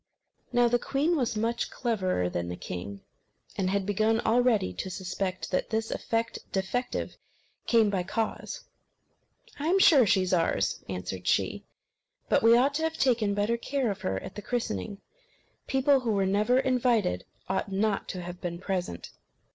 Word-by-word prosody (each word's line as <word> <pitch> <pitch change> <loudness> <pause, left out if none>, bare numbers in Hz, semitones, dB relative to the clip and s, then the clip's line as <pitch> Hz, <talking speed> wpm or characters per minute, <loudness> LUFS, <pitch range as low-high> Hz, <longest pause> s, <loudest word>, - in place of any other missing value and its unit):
Now 245 -1 +4
the 240 +1 +2
queen 290 +7 +1
was 245 -7 0
much 230 +2 -1
cleverer 185 - -1
than 85 -1 -3
the 90 - -4
king, 95 +3 -7 0.5
and 185 -2 0
had 200 0 0
begun 215 +3 +2
already 230 - +2
to 95 - -5
suspect 185 0 -4
that 185 - 0
"this 225 0 -1
effect 230 0 -2
defective 220 +6 -2 0.5
came 225 -3 +4
by 190 -2 0
cause." 220 +5 -3 1.0
"I 295 - -2
am 365 +3 +4
sure 285 - +6
she 190 -1 +3
is 185 - -1
ours," 170 -2 +1
answered 90 0 -5
she. - - +1 0.6
"But - - +4
we 230 +1 +6
ought 270 +4 +3
to - - -3
have 320 0 -1
taken 225 -6 +2
better 210 +3 +1
care 260 -1 -1
of 195 - -7
her 95 0 -1
at - - -8
the 210 - -7
christening. 200 - -3 0.7
People 270 +1 +3
who 235 -4 -1
were 195 -1 +2
never 210 +6 +2
invited 250 - +1 0.2
ought 190 +1 -2
not 200 +1 0
to 180 -2 -5
have 175 0 -8
been 170 -1 -3
present." 180 - -4
210 Hz, 165 wpm, -28 LUFS, 185-245 Hz, 1.0 s, sure